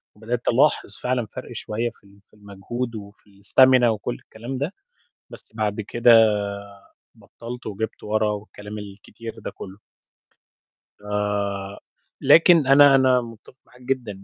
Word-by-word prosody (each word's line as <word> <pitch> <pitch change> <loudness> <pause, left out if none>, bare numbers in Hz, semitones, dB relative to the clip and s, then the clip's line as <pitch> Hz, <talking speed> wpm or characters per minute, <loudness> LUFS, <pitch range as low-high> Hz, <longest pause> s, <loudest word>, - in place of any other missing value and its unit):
وبدأت 115 +3 -5
ألاحظ 135 +6 +2
فعلًا 125 -1 -1
فَرق 105 - -10
شوية 115 +3 -3
في - - -28
ال 100 0 -21
في - - -39
المجهود، 105 +4 -6
وفي 100 -1 -13
الstamina 130 +4 +5
وكلّ 110 - -1
الكلام 120 - -8
ده، 145 +8 -3 0.6
بس - - -14
بعد 110 -1 -2
كده 120 +3 +3 1.0
بطّلت، 120 +1 -10
وجِبت 110 +1 -5
ورّا، 105 0 0
والكلام 105 0 -8
الكتير 105 +3 -10
ده - - -7
كلّه. 95 +1 -11 1.2
ف - - -23 1.2
لكن 165 -4 +6
أنا 140 0 +7
أنا 130 -1 +4
مُتفق 115 +1 -13
معاك 125 - -21
جدًا، 120 -7 -4
115 Hz, 130 wpm, -23 LUFS, 105-125 Hz, 1.2 s, أنا